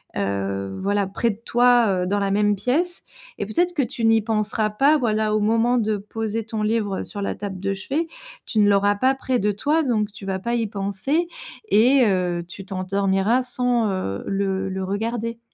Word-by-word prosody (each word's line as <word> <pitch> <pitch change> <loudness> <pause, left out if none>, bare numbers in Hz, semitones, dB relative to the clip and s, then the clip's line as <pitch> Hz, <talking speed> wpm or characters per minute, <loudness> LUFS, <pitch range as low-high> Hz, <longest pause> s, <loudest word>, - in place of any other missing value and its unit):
heu, 100 0 -2
voilà, 200 0 +1
près 220 +4 0
de 205 - -9
toi, 245 -1 +4 0.2
heu, - - -2
dans 205 +2 +1
la 200 -1 0
même 205 0 +2
pièce 300 - -1 0.4
et 205 - -1
peut-être 350 +10 +1
que 300 - +1
tu 235 -1 -2
n'y 225 0 +5
penseras 215 0 0
pas. 275 +9 +3
Voilà, 215 -4 0
au - - +2
moment 230 +3 +2
de 215 -1 0
poser 220 +2 -4
ton 220 -1 -4
livre 210 -3 0
sur 205 - -7
la - - -1
table 195 -2 -6
de 195 +1 -1
chevet. 275 - -2 0.4
Tu 220 - -1
ne 205 -1 +5
l'auras 200 0 +3
pas 260 +6 +2
près 260 -2 -1
de 210 0 +1
toi 295 +10 +1
donc 220 -6 0
tu 205 -1 -11
vas 190 -1 -1
pas 235 +5 -3
y 230 -2 0
penser 205 - -1 0.4
et 250 +4 +5
heu, 180 -3 0
tu 195 +2 -10
t'endormiras 195 +4 +1
sans, 245 -3 0
heu, 100 - -3
le 195 -1 -1
le 190 0 -3
regarder. 230 +4 -3
210 Hz, 195 wpm, -23 LUFS, 195-235 Hz, 0.4 s, n'y